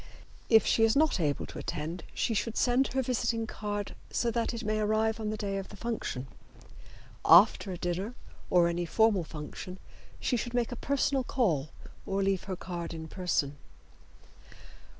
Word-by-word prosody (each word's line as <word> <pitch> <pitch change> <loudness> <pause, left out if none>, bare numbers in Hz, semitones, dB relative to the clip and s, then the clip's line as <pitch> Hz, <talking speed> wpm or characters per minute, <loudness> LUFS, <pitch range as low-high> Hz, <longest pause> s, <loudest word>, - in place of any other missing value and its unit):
If 220 -2 +6
she 225 - +3
is 225 0 +4
not 305 -6 +3
able 145 -4 0
to - - -8
attend 165 +1 -4
she 230 - 0
should 225 +2 -1
send 250 +2 +3
her 265 0 +1
visiting 235 -2 0
card 205 -2 -4 0.2
so 235 - 0
that 230 0 0
it 235 -1 -5
may 215 0 0
arrive 220 +1 +1
on 215 -1 -2
the 215 - -2
day 200 -2 -2
of 195 - -7
the - - -10
function. 215 - -3 1.0
After 190 +3 +6
a 180 - -4
dinner 180 +7 -3 0.3
or 175 -1 +5
any 170 0 -1
formal 220 0 +3
function 160 +4 -7 0.4
she 245 - +1
should 240 +2 -4
make 240 -1 +1
a - - -3
personal 275 +1 +1
call 170 - 0 0.4
or 195 0 0
leave 195 -1 0
her 190 -1 -3
card 170 -2 -5
in 160 0 -7
person. 150 -6 -1
210 Hz, 170 wpm, -30 LUFS, 175-230 Hz, 1.0 s, If